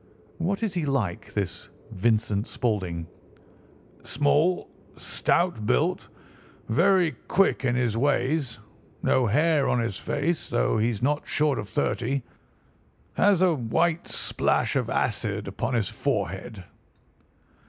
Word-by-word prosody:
"What 195 +6 -1
is 210 -4 -1
he 175 -3 -1
like, 130 -11 -2
this 100 -3 -3 0.2
Vincent 105 0 0
Spaulding?" 95 -8 -2 1.0
"Small, 145 +6 +1 0.3
stout 175 -10 0
built, 60 - +1 0.6
very 175 - +3 0.2
quick 195 -7 +2
in 120 -1 +2
his 120 -3 0
ways, 140 +1 0 0.5
no 130 -2 +3
hair 150 +5 +2
on 125 - +2
his 115 -5 -2
face, 155 +3 -2
though 120 -2 +1
he's 115 0 0
not 145 +3 0
short 150 -3 +1
of 105 -1 -6
thirty. 130 +2 -1 0.9
Has 190 - +3
a 180 -2 +4
white 160 +6 0
splash - - 0
of - - 0
acid - - -1
upon 120 +2 -2
his 110 -5 +1
forehead." 100 -5 -3
130 Hz, 120 wpm, -26 LUFS, 110-165 Hz, 1.0 s, a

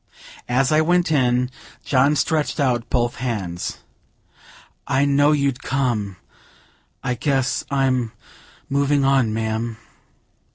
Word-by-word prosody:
As 130 +3 +2
I 155 0 +4
went 175 +1 +2
in, 125 -3 +2 0.3
John 140 +2 +3
stretched 155 +2 0
out 125 -4 0
both 120 -1 0
hands: 105 -9 -3 1.1
"I 135 +2 +2
know 145 +1 +4
you'd 140 -3 0
come! 120 -7 -1 0.9
I 125 - 0
guess 135 +1 0
I'm 130 -4 +1 0.6
moving 140 0 +1
on, 135 -5 +3
ma'am." 110 +1 -2
130 Hz, 110 wpm, -21 LUFS, 120-140 Hz, 1.1 s, I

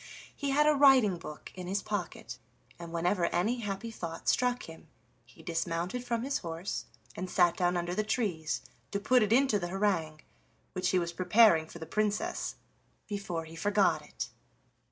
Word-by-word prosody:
He 285 - -2
had 295 +2 +4
a 300 - +5
writing 265 -9 +6
book 150 -2 -9
in 180 -1 -7
his 195 +2 -1
pocket, 205 -4 -4 0.4
and 170 -1 -8
whenever 175 +2 +1
any 220 +8 0
happy 210 +1 -4
thought 165 -6 -7
struck 250 0 +2
him 165 0 -11 0.4
he - - -17
dismounted 170 +7 -2
from 235 -1 -1
his 275 +2 -1
horse 165 +1 -4 0.3
and 185 +1 -4
sat 175 -2 +4
down 180 -1 +1
under 175 0 -2
the 215 - +1
trees 195 -9 -1 0.3
to 200 - -2
put 250 +5 +4
it 210 -1 +1
into 255 -3 +4
the 175 - -3
harangue 175 -5 0 0.5
which 185 -1 0
he 185 - +2
was 170 -1 -1
preparing 180 -3 +5
for 170 - -10
the 160 - -7
Princess, 210 +5 -1 0.5
before 200 -6 -4
he 160 +1 -11
forgot 205 +4 +2
it. - - -6
190 Hz, 175 wpm, -31 LUFS, 170-220 Hz, 0.5 s, writing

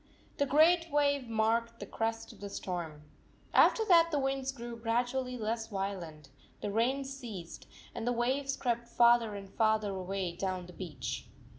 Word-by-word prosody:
The 285 - +1
great 330 +4 +5
wave 285 -4 +1
marked 230 +1 +1
the - - -5
crest 225 0 -3
of - - -18
the 200 - -5
storm. 170 -6 -5 0.5
After 445 - +5
that 335 -4 +6
the 305 - 0
winds 270 -1 -1
grew 240 -3 -7
gradually 245 +2 -1
less 225 0 -2
violent, 185 -8 -5 0.3
the 205 - -3
rain 250 +6 +1
ceased, 235 -11 -8 0.3
and 230 - -4
the - - +3
waves 265 +3 0
crept 235 -1 -1
farther 235 -2 +4
and 200 -1 -7
farther 215 0 +1
away 190 -1 -3
down 185 -1 -3
the 180 - -12
beach. 170 -6 -5
230 Hz, 160 wpm, -32 LUFS, 195-265 Hz, 0.5 s, that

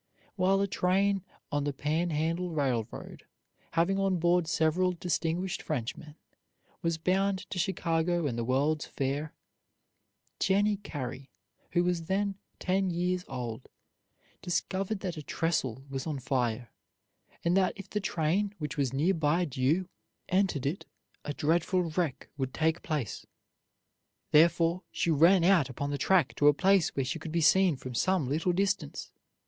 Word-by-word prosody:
While 195 +1 +3
a 200 - +1
train 195 +1 +1 0.3
on 145 0 0
the 145 0 -1
Pan 155 +5 -1
Handle 165 +3 -1
Railroad, 130 -8 -3 0.5
having 170 +4 +2
on 195 -2 +2
board 175 0 +2
several 175 +3 +2
distinguished 175 +2 -2
Frenchmen, 150 +2 -4 0.7
was 165 -1 0
bound 190 +3 0
to 180 - -3
Chicago 170 -2 0
and 130 -5 -1
the 120 - -2
World's 140 +5 +1
Fair, 140 +3 -3 1.0
Jennie 205 +2 +2
Carey, 135 -8 -6 0.4
who 175 0 +3
was 175 -2 0
then 200 +1 0 0.2
ten 190 +1 0
years 180 +1 -1
old, 125 -1 -6 0.7
discovered 190 +4 -2
that 180 -4 -4
a - - -4
trestle 140 -6 -1
was 135 0 -5
on 150 -3 -2
fire, 125 -3 -1 0.7
and 170 +1 +3
that 190 -1 +3
if 195 -1 -9
the 210 - -2
train, 190 +4 0
which 150 -4 -5
was 135 -4 +1
nearly 165 +3 +2
due, 150 +6 0 0.4
entered 185 -7 +1
it 150 +8 -2 0.4
a 150 - -3
dreadful 170 +5 +1
wreck 155 -5 -2
would 130 -1 -2
take 160 +2 +1
place. 150 - -3 1.0
Thereupon 170 +2 +4
she 170 - 0
ran 165 +4 +5
out 170 -7 +4
upon 140 +3 -3
the 145 - -2
track 180 -8 +3
to 145 - +4
a 145 - +6
place 195 0 +3
where 135 - 0
she 130 - -3
could 160 - -7
be 170 - +1
seen 185 +1 +5
from 130 -1 -8
some 180 +2 +1
little 160 +6 +1
distance. 190 -5 -1
165 Hz, 150 wpm, -30 LUFS, 145-185 Hz, 1.0 s, a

